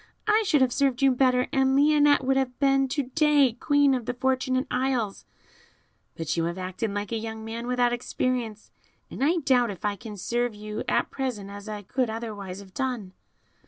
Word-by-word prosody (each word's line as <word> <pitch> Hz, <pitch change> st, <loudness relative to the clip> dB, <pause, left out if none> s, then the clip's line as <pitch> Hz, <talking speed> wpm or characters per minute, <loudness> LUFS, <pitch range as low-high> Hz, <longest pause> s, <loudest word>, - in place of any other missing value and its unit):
I 425 Hz, +1 st, +4 dB
should 295 Hz, -5 st, +3 dB
have 255 Hz, -2 st, +3 dB
served 275 Hz, -2 st, +1 dB
you 270 Hz, -, +6 dB
better, 250 Hz, 0 st, +2 dB
and 265 Hz, -1 st, +3 dB
Lionette 290 Hz, 0 st, +4 dB
would 265 Hz, +1 st, +2 dB
have 265 Hz, -2 st, -1 dB
been 270 Hz, -1 st, +3 dB
to 285 Hz, +2 st, -1 dB
day 285 Hz, -1 st, +3 dB
Queen 285 Hz, +3 st, +3 dB
of 250 Hz, -4 st, -2 dB
the 245 Hz, -, -2 dB
Fortunate 260 Hz, +1 st, 0 dB
Isles; 250 Hz, -5 st, -1 dB, 0.9 s
but 165 Hz, -2 st, -2 dB
you 165 Hz, -1 st, 0 dB
have 170 Hz, +2 st, -3 dB
acted 185 Hz, +4 st, -3 dB
like 205 Hz, +1 st, -4 dB
a 230 Hz, -, 0 dB
young 220 Hz, 0 st, -6 dB
man 230 Hz, +2 st, -5 dB
without 245 Hz, -1 st, +2 dB
experience, 240 Hz, -3 st, -3 dB, 0.4 s
and -, -, -3 dB
I 320 Hz, +5 st, +3 dB
doubt 255 Hz, -6 st, +2 dB
if 200 Hz, 0 st, -7 dB
I 205 Hz, -1 st, 0 dB
can 210 Hz, +2 st, -9 dB
serve 240 Hz, +3 st, -1 dB
you 210 Hz, 0 st, -6 dB
at -, -, +1 dB
present 230 Hz, -7 st, -4 dB
as 205 Hz, +1 st, -9 dB
I 210 Hz, -1 st, -6 dB
could 250 Hz, +4 st, -1 dB
otherwise 205 Hz, -4 st, -6 dB
have 190 Hz, -1 st, -15 dB
done." 245 Hz, -8 st, -3 dB
245 Hz, 195 wpm, -26 LUFS, 215-270 Hz, 0.9 s, you